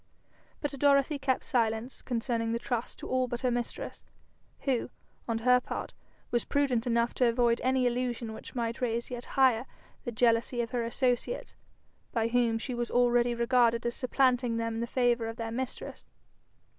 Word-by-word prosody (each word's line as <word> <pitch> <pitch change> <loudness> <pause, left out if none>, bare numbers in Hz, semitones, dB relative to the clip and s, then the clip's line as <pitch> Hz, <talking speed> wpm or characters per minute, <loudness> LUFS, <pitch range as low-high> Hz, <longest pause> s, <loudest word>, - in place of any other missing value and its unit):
But 290 - -1
Dorothy 280 +1 +3
kept 265 -2 0
silence 230 +1 0
concerning 230 -2 -1
the - - +1
trust 240 -1 -3
to - - -7
all 255 0 +1
but 240 -1 -4
her 255 - +1
mistress, 240 0 -4 0.6
who, 260 -4 0 0.4
on 230 -1 0
her 250 +2 +5
part, - - -5 0.4
was 240 - +1
prudent 265 -4 +1
enough 235 0 +2
to 250 - +3
avoid 235 0 +2
any 260 0 +2
allusion 240 -2 -1
which 220 - -10
might 235 -1 -2
raise 235 0 -1
yet 245 -1 -5
higher 255 -2 +4 0.4
the 240 - -3
jealousy 235 +1 +2
of 230 - -4
her 245 -2 0
associates, 245 - -1 0.6
by 230 -1 0
whom 235 -1 +2
she 250 +3 -4
was 240 -1 -2
already 240 0 +3
regarded 235 -1 +3
as 235 - 0
supplanting 250 -2 +2
them 230 0 -1
in 225 - -3
the 235 - -2
favour 240 -2 +1
of 225 - -5
their 225 -1 -4
mistress. 255 +2 -5
240 Hz, 170 wpm, -30 LUFS, 230-255 Hz, 0.6 s, her